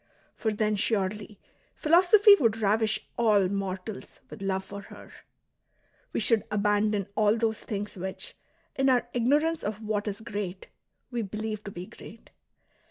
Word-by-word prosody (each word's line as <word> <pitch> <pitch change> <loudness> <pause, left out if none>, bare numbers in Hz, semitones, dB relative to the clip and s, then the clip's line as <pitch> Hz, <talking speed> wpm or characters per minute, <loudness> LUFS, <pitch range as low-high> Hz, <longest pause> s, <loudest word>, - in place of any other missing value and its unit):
For 220 - -1
then 210 0 0
surely 205 0 -1 0.4
philosophy 370 +6 +6
would 225 -4 +2
ravish 215 0 +1
all 210 -5 +4
mortals 195 +1 -5
with - - -9
love 190 -1 -1
for 200 +1 -8
her"; - - -13 1.0
we - - -1
should 225 -3 +2
abandon 210 -1 +1
all 210 +1 +3
those 220 -1 0
things 205 0 -5
which, 190 0 -5 0.4
in 270 0 +2
our 245 -2 +3
ignorance 295 +7 +2
of 210 0 -3
what 215 -1 -2
is 205 +1 -4
great, 205 -4 -5 0.4
we 240 -1 -1
believe 215 +1 -4
to 200 - -6
be 175 -1 -7
great. 220 +3 -14
210 Hz, 145 wpm, -28 LUFS, 200-230 Hz, 1.0 s, philosophy